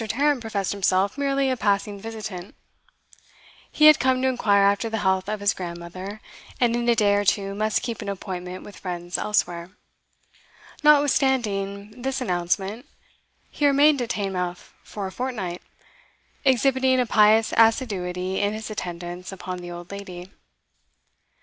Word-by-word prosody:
Tarrant 275 +5 +1
professed 205 -4 -2
himself 195 +1 +1
merely 275 -1 +1
a - - +1
passing 205 -2 0
visitant; 215 -4 -7 1.2
he 305 - +3
had 305 -1 +9
come 260 0 +2
to - - +3
inquire 205 -6 +3
after 200 +3 +2
the 225 - -2
health 190 +1 +1
of 215 -1 -3
his 205 - +2
grandmother, 180 +3 -7 0.4
and 235 -2 +2
in 240 0 0
a 235 - +4
day 205 -2 +3
or 205 0 +2
two 195 0 +1
must 215 +1 0
keep 235 -3 -4
an - - -5
appointment 185 -2 -6
with 205 - -12
friends 175 -1 -5
elsewhere. 175 -4 -1 1.1
Notwithstanding 245 -8 +2
this 265 +1 -2
announcement, 195 - -2 0.6
he 290 - +1
remained 285 0 +4
at 240 - -3
Teignmouth 185 -5 -3
for 205 -2 -6
a 190 - -5
fortnight, 210 -8 -4 0.8
exhibiting 260 0 +3
a 250 - +2
pious 215 0 +4
assiduity 190 -6 +1
in 205 +1 0
his 220 0 -6
attendance 175 -2 -6
upon 185 -1 -6
the 175 0 -8
old 175 +1 -9
lady. 190 -2 -8
205 Hz, 145 wpm, -24 LUFS, 185-245 Hz, 1.2 s, had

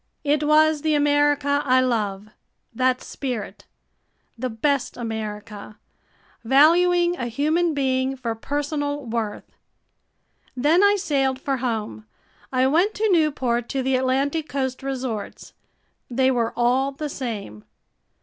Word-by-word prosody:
It 295 0 +1
was 305 0 +4
the 310 0 +1
America 290 -1 +2
I 255 -1 +3
love 210 -5 -1 0.4
that 255 +1 +1
spirit. 215 -6 -6 0.7
The 255 +2 -3
best 265 +4 -1
America 215 -2 -6 0.7
valuing 345 +7 +4
a 240 - -3
human 310 +7 0
being 265 -1 0
for 235 -3 -3
personal 290 +3 -3
worth. 225 -2 -4 1.1
Then 310 +9 +3
I 405 0 +5
sailed 275 -8 0
for 275 0 -2
home. 215 - -4 0.4
I 255 0 +2
went 340 +10 +2
to 430 -1 +1
Newport, 265 -8 +1
to 270 -2 -2
the 265 0 +1
Atlantic 275 +4 0
coast 260 -1 -3
resorts. 255 -6 -5 0.6
They 260 +1 +2
were 235 -3 0
all 255 +3 +2
the 300 +2 -4
same. 210 - -6
265 Hz, 120 wpm, -23 LUFS, 235-290 Hz, 1.1 s, I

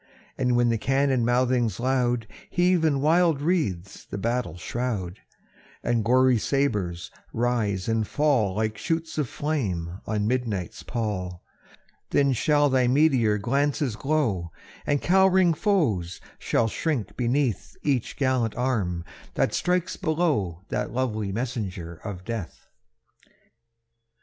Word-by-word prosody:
And 125 -1 +1
when 120 0 +3
the 115 -1 +1
cannon 135 -1 +2
mouthings 120 -3 +1
loud 125 -2 +1 0.2
Heave 180 -1 +2
in 145 -4 +2
wild 165 0 +3
wreaths 140 - -1
the - - -7
battle 115 -1 -2
shroud, 105 -3 -3 0.6
And 115 -2 +1
gory 130 +1 +4
sabres 105 -11 -1 0.2
rise 110 -5 0
and 115 -2 0
fall 130 -11 +1
Like 110 0 -1
shoots 165 -1 -2
of 140 -6 -1
flame 95 - -2
on 105 -2 0
midnight's 110 -7 -2
pall; 95 -7 -4 0.7
Then 140 -1 +3
shall 145 +5 +3
thy 130 -2 +2
meteor 125 -6 +3
glances 135 +2 0
glow, 115 - 0 0.4
And 145 -1 +1
cowering 190 -1 +4
foes 140 - 0 0.2
shall 115 - +1
shrink 135 - -2
beneath 125 -1 -1
Each 135 -6 -1
gallant 130 -5 +1
arm 100 -10 -1 0.3
that - - +1
strikes 180 -1 0
below 150 - 0
That - - -2
lovely 110 -5 -1
messenger 100 -8 -4
of 95 -4 -6
death. 115 -5 -6
120 Hz, 120 wpm, -25 LUFS, 105-145 Hz, 0.7 s, gory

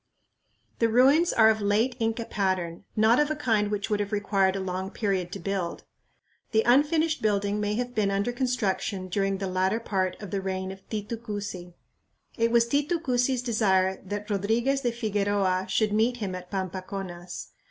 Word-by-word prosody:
The 230 - +3
ruins 275 +9 +5
are 220 -1 +6
of 220 -1 -2
late 215 +5 +2
Inca 225 0 -1
pattern, 185 -4 -2
not 220 +4 +4
of 295 0 +2
a 310 - -1
kind 220 -8 +1
which 205 -1 -2
would 210 - +1
have 205 0 -2
required 195 -2 +1
a - - -2
long 190 0 -3
period 195 -5 -1
to - - -5
build. 185 -1 -3 0.7
The 220 0 +4
unfinished 300 +6 +3
building 205 -1 +1
may 210 0 0
have 245 +1 -3
been 215 -4 +1
under 200 +4 0
construction 220 -6 -1
during 195 +1 0
the 195 - -3
latter 190 +3 0
part 190 -5 -1
of 205 -4 -8
the 195 - -1
reign 190 0 -3
of 190 0 -10
Titu 215 +1 -4
Cusi. 205 -6 -6 0.6
It 230 -1 +2
was 235 0 +4
Titu 290 +6 +1
Cusi's 250 -3 0
desire 190 -5 +2
that 205 +2 -5
Rodriguez 225 +7 +1
de 245 -3 0
Figueroa 205 -4 0
should 210 +1 +1
meet 230 +3 +2
him 200 -5 -3
at 180 0 -7
Pampaconas. 185 -2 -5
205 Hz, 175 wpm, -27 LUFS, 190-235 Hz, 0.7 s, are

